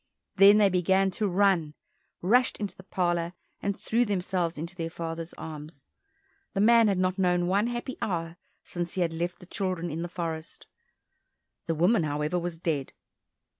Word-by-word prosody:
Then 200 +2 +8
they 205 -2 +5
began 190 +1 +2
to 210 +3 -1
run, 180 -5 +2 0.5
rushed 245 +7 +3
into 205 -2 -4
the - - -12
parlour, 175 -2 -1 0.3
and 200 0 -2
threw 235 +2 +1
themselves 180 -5 -1
into 170 +4 -5
their 165 -2 -3
father's 165 0 -5
arms. 150 -2 -9 0.7
The - - 0
man 230 +2 +6
had 200 -2 +2
not 185 +1 0
known 180 -1 +2
one 200 +5 +2
happy 240 +2 -4
hour 165 -3 -2 0.3
since 175 -1 -4
he 185 - -1
had 165 -2 +1
left 175 +2 -3
the - - -14
children 180 -3 -3
in 160 +2 -3
the 175 - -4
forest; 165 -2 -5 1.0
the 165 - 0
woman, 180 +7 +3
however, 150 +3 -1
was 170 -1 -4
dead. 155 -5 -2
180 Hz, 170 wpm, -28 LUFS, 165-195 Hz, 1.0 s, Then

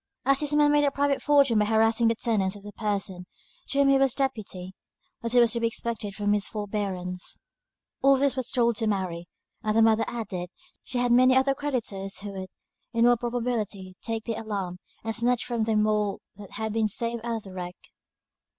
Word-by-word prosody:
As 275 0 +4
this 295 -1 +1
man 295 0 +5
made 295 0 +4
a 285 - +4
private 280 0 0
fortune 280 -6 +4
by 210 - +3
harassing 225 +2 +3
the 230 - +2
tenants 210 -4 0
of 205 - -12
the 205 - -8
person 200 -4 -3 0.4
to 275 - -2
whom 280 -1 +5
he 275 0 +5
was 270 -1 +3
deputy, 210 -9 -3 0.5
little 235 +1 +3
was 235 0 +4
to 235 - 0
be 230 - +2
expected 225 -3 -3
from 205 0 +1
his 205 -1 +1
forbearance. 195 -4 -4 0.6
All 275 0 +5
this 275 0 +1
was 260 -2 -1
told 235 -4 +2
to 225 - 0
Mary 185 -4 -2 0.3
and 215 0 0
the 225 - +6
mother 225 0 +4
added, 200 -7 -4 0.3
she 255 - -4
had 245 0 +1
many 255 +2 +6
other 270 +1 +3
creditors 230 -9 -3
who 205 0 -6
would, 190 -1 -7 0.4
in 230 0 +3
all 245 0 +6
probability, 230 -5 -3
take 225 -1 -3
the 230 - -3
alarm, 195 -5 -4 0.2
and 225 0 -2
snatch 240 +1 +1
from 235 -3 -1
them 215 -1 +2
all 210 -2 0 0.2
that 200 -1 -12
had 220 0 -3
been 220 -1 +2
saved 230 +2 -1
out 235 -1 -2
of 220 - -5
the 190 - -11
wreck. 180 -1 -6
225 Hz, 205 wpm, -26 LUFS, 205-245 Hz, 0.6 s, the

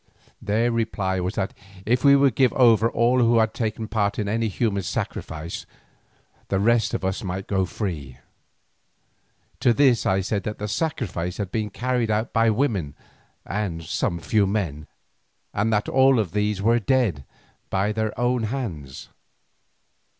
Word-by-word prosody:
Their 115 +4 +1
reply 105 -5 -1
was 90 +3 -2
that 100 -2 -2 0.3
if 125 +3 +1
we 140 -1 +7
would 140 -3 +4
give 130 +1 +3
over 115 -3 +5
all 120 +3 +2
who 115 -1 +4
had 110 -1 +3
any 110 0 -2
part 105 -2 -1
in 105 - -1
the 115 +3 0
human 100 -1 -1
sacrifice, 80 -2 -5 0.8
the 95 - 0
rest 115 +1 +2
of - - -3
us 95 +1 -2
might 95 0 -4
go 95 -2 0
free. 80 - -5 1.4
To 120 - +4
this 130 -3 +3
I 95 0 +2
said 100 +1 -1
that 105 +1 -5
the 105 - -4
sacrifice 100 - -2
had 100 -3 -4
been 110 -1 -2
carried 125 +2 -1
out 110 +2 -1
by 115 0 +4
women 105 - 0 0.5
and 90 -4 -3
some 85 +2 -1
few 100 +4 +1
men, 85 -8 -2 0.7
and 105 +3 0
that 105 -1 +1
all 135 0 +4
of 105 -7 0
these 105 -1 -1
were 115 +2 +4
dead 115 - +1 0.5
by 100 +2 0
their 110 +1 -2
own 120 -1 +1
hands. 90 - -5
105 Hz, 155 wpm, -24 LUFS, 95-115 Hz, 1.4 s, we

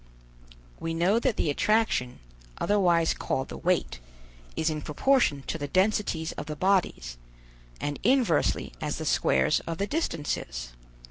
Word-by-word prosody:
We 165 0 -3
know 185 +7 +3
that 245 -2 0
the 150 - +1
attraction, 210 - +1 0.4
otherwise 175 -5 +2
called 130 0 -3
the - - -7
weight, 180 - 0 0.6
is 160 0 0
in 155 -1 -4
proportion 150 - +2
to 165 - -3
the 145 - -3
densities 185 -2 +1
of - - -7
the 155 - -4
bodies, 170 - 0 0.6
and 145 0 -3
inversely 255 +3 +2
as - - -2
the - - -5
squares - - +2
of 165 -1 -3
the 200 - 0
distances. 145 - -3
165 Hz, 140 wpm, -27 LUFS, 145-205 Hz, 0.6 s, know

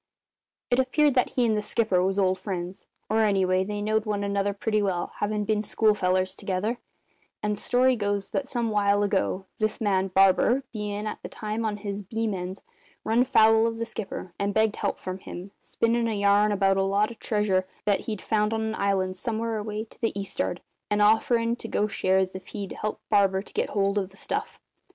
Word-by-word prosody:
"It 245 - +3
appeared 285 +3 +3
that 250 -1 +2
he 250 - +2
and 220 -2 +2
the 210 - 0
skipper 210 -4 +1
was 190 +1 0
old 185 -1 +2
friends 185 -1 -5 0.2
or 220 +1 +1
anyway 190 -3 +3
they 205 +1 -4
knowed 215 +1 0
one 205 -1 -1
another 200 0 0
pretty 215 +1 0
well, 185 -4 -1
havin' 210 0 -1
been 215 0 +1
schoolfellers 185 -4 +1
together; 205 +7 -2 0.6
and 210 0 0
the 205 - -9
story 255 +1 +3
goes 205 -2 -2
that 275 - -1
some 240 -4 -1
while 205 -1 +3
ago 195 -1 0
this 215 -1 0
man, 195 -3 +1
Barber, 195 +7 +4
bein' 210 -1 -3
at 215 - -5
the - - -7
time 215 +1 -4
on 210 -1 -1
his 200 -1 -4
beam 220 +2 -2
ends, 185 +1 -5 0.4
runned 240 +3 +2
foul 225 -1 +5
of 225 0 -3
the 230 - -2
skipper 205 -5 -6
and 200 0 -1
begged 220 -1 +2
help 200 - -1
from 185 0 -6
him, 185 +1 -8
spinnin' 230 0 0
a 225 - -1
yarn 205 +1 +4
about 195 -1 +2
a - - +3
lot 200 +3 +1
of 230 - -12
treasure 200 -4 0 0.2
that 205 -1 +3
he'd 215 -3 -4
found 210 0 +1
on 220 - -1
an 220 0 -2
island 190 -2 0
somewhere 225 +1 -2
away 210 0 -4
to 225 - -18
the 225 -3 -1
east'ard, 190 -2 -3 0.3
and 210 - +1
offerin' 230 +2 +3
to 225 - -7
go 210 - +1
shares 190 -2 +1
if 190 - -8
he'd 200 -3 -6
help 215 - -4
Barber 195 -2 +3
to - - -14
get - - 0
hold 200 0 +1
of 190 -2 -3
the 195 - -17
stuff. - - -3
210 Hz, 205 wpm, -26 LUFS, 195-220 Hz, 0.6 s, foul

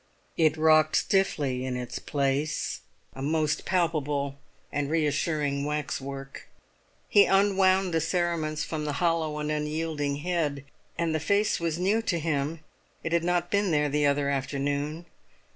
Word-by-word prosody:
It 160 -2 +3
rocked 155 0 +4
stiffly 145 -10 +1
in 130 -1 -2
its 125 -1 -5
place, 140 +2 -1 0.3
a 135 - -8
most 155 +1 0
palpable 150 -6 0 0.3
and 145 0 -1
reassuring 150 -2 0
waxwork. 140 -2 -4 0.6
He 205 - +6
unwound 195 -2 +3
the 165 - +2
cerements 165 -2 -1
from 155 -2 -4
the 150 - -2
hollow 160 -1 0
and 150 0 -2
unyielding 150 -1 -2
head; 150 -6 -1 0.3
and 165 -1 0
the 155 - +1
face 200 +7 +1
was 165 -1 -1
new 200 +5 +2
to 195 -6 -1
him; 155 0 -2 0.4
it 165 - -3
had 170 0 +2
not 175 0 0
been 200 -1 +2
there 150 -2 +2
the 145 0 +2
other 140 0 +1
afternoon. 145 +4 -2
155 Hz, 145 wpm, -27 LUFS, 145-170 Hz, 0.6 s, He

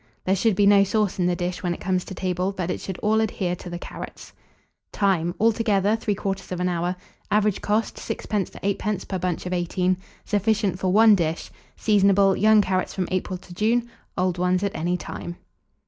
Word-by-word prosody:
There 190 - +3
should 215 +1 +2
be 205 +1 +3
no 200 0 +6
sauce 205 -1 0
in 180 - +2
the 180 - +1
dish 175 0 -3
when 175 -1 -1
it - - -12
comes 185 -1 0
to 190 - -8
table, 185 +1 -1
but 185 -2 -3
it - - -4
should 190 -2 -5
all 220 +1 +3
adhere 190 -5 -1
to 180 - -9
the 175 - -5
carrots. - - -9 0.6
Time. 180 -4 +1
Altogether, 215 -2 +2
3/4 195 -4 -2
hour. 175 +1 -1 0.3
Average 210 -1 +2
cost, 215 +2 0
6d. 205 -4 -3
to - - -10
8d. 200 0 -2
per 190 - -3
bunch 180 -1 -2
of 180 - -3
18. 180 +1 0 0.3
Sufficient 205 -2 +1
for 185 -1 0
1 220 +2 +7
dish. 165 -4 -1 0.3
Seasonable. 200 -2 +4
Young 215 0 +5
carrots 185 -1 -1
from 185 -2 -1
April 185 0 -2
to 180 0 -13
June, 230 +5 +1 0.3
old 180 -1 0
ones 180 +1 +1
at 200 - -2
any 175 +3 0
time. 175 -1 -7
190 Hz, 190 wpm, -24 LUFS, 180-205 Hz, 0.6 s, 1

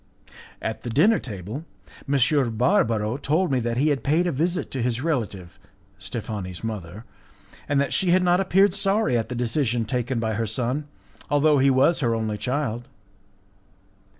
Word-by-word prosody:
At 110 - -3
the 120 - -5
dinner 180 - +4
table 105 - -7 0.5
M. 135 -4 +2
Barbaro 115 - +2
told 155 +4 0
me 130 - +2
that 120 0 -2
he 145 +4 +2
had 140 -5 -1
paid 160 +5 +2
a 175 - +1
visit 170 +5 -1
to 130 - -3
his 120 0 0
relative, 105 - -3 0.4
Steffani's 95 -4 -6
mother, 105 -1 -6 0.6
and 145 -1 +2
that 140 - 0
she 190 - +1
had 180 +1 +4
not 180 0 +3
appeared 195 0 +3
sorry 200 - +2
at 115 -2 -1
the 125 - -4
decision 120 -1 0
taken 125 +1 -2
by 110 -1 -1
her 110 +1 -2
son, 125 +7 -1 0.4
although 145 0 +3
he 135 +1 +4
was 135 +6 +3
her 115 -4 +1
only 110 -2 -2
child. 125 0 -2
125 Hz, 165 wpm, -24 LUFS, 115-150 Hz, 0.6 s, dinner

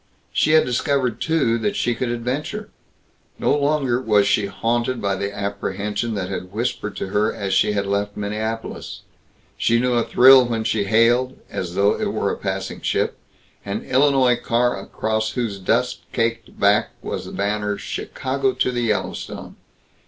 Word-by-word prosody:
She 155 - +3
had 160 - +6
discovered, 125 -1 0
too, 140 -8 +1
that 205 - -1
she 120 - +1
could 120 +1 -2
adventure. 130 - -3 0.7
No - - +2
longer 140 -4 +1
was 105 -4 +3
she 110 -6 +2
haunted 120 +5 -1
by 100 -1 0
the 100 +1 -3
apprehension 100 +2 -3
that 95 -3 -2
had 90 -1 -5
whispered 110 -1 -3
to - - -4
her 105 +2 +1
as 100 -3 -3
she 95 +2 +3
had 100 -1 0
left 100 +1 -2
Minneapolis. 110 +2 -4 0.6
She 115 0 +3
knew 125 +1 +1
a 120 -1 +2
thrill 130 +2 +7
when 115 -2 -1
she 110 -2 0
hailed 120 +5 +3
as 90 -1 -4
though 100 +1 +3
it - - -1
were - - 0
a - - -2
passing - - -4
ship - - 0 0.5
an 100 +2 -4
Illinois 130 -2 +3
car 120 0 +1
across 110 +2 -2
whose 115 -6 -2
dust 125 +6 0
caked 115 0 -2
back 100 +3 +3
was - - -4
a - - -8
banner 105 0 -1
"Chicago 130 - -2
to 125 - 0
the 120 -1 -1
Yellowstone." 110 -3 -3
115 Hz, 165 wpm, -22 LUFS, 100-125 Hz, 0.7 s, thrill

